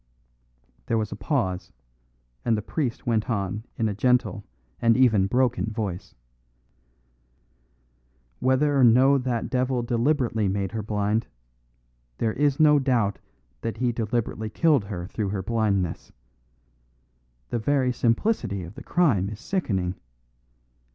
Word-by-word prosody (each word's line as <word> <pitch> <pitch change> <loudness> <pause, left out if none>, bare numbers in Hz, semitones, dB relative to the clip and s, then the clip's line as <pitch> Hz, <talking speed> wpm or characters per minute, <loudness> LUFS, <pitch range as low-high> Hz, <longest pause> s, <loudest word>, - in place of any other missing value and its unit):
There 115 - +1
was 110 -1 -2
a - - -4
pause, 100 - -2 0.7
and 115 -2 +2
the 105 - -4
priest 130 -1 -3
went 115 0 0
on 105 0 -2
in 110 - +1
a 105 - -1
gentle 125 +4 +1 0.4
and 115 0 +4
even 110 -7 +4
broken 125 +1 +1
voice. 105 -5 -4 2.2
"Whether 140 +3 +2
or 135 - +4
no 130 +4 +6
that 125 -3 -2
devil 130 -1 0
deliberately 120 -2 +1
made 95 -1 -1
her 110 - -3
blind, 105 +1 -1 0.9
there 110 -1 0
is 145 +1 +1
no 150 -1 +6
doubt 120 -7 +1 0.4
that 115 - -4
he 125 -1 +1
deliberately 110 -1 -2
killed 145 -1 +2
her 90 -4 -5
through 100 +1 -3
her 95 -1 -3
blindness. 100 -5 -1 1.4
The 120 - 0
very 130 +1 +1
simplicity 115 - 0
of 85 +3 -9
the - - -10
crime 120 - +2
is 105 0 -8
sickening. 100 - -1
115 Hz, 130 wpm, -25 LUFS, 105-130 Hz, 2.2 s, no